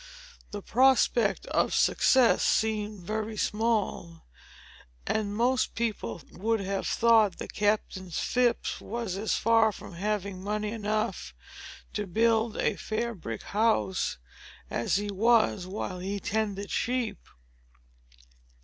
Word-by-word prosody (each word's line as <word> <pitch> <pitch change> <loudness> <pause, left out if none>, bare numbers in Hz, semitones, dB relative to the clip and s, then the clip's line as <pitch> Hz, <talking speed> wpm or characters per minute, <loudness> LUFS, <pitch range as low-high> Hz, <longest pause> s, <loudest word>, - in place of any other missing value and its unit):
The 205 -1 -7
prospect 245 -3 +3
of - - 0
success 255 -3 +4
seemed 215 -2 0
very 215 +3 -4
small; 210 -7 -1 0.8
and 205 -1 -1
most 245 +3 +1
people 215 - -3
would 225 +4 -1
have 195 0 -2
thought 225 -4 +4
that - - -7
Captain 205 -3 -1
Phips 240 +7 0
was 230 -4 -4
as 210 +3 -1
far 225 -1 +4
from 195 - -11
having 200 0 -3
money 210 +1 -2
enough 215 0 -2 0.6
to 210 -1 -3
build 225 +3 +1
a - - 0
"fair 235 +2 -2
brick 115 - -7
house," 200 - 0 0.5
as 115 - 0
he 205 +1 -1
was 215 -2 +2
while 185 -1 -5
he 195 +2 -3
tended 205 -1 -2
sheep. 240 -4 -1
210 Hz, 115 wpm, -28 LUFS, 195-230 Hz, 0.8 s, success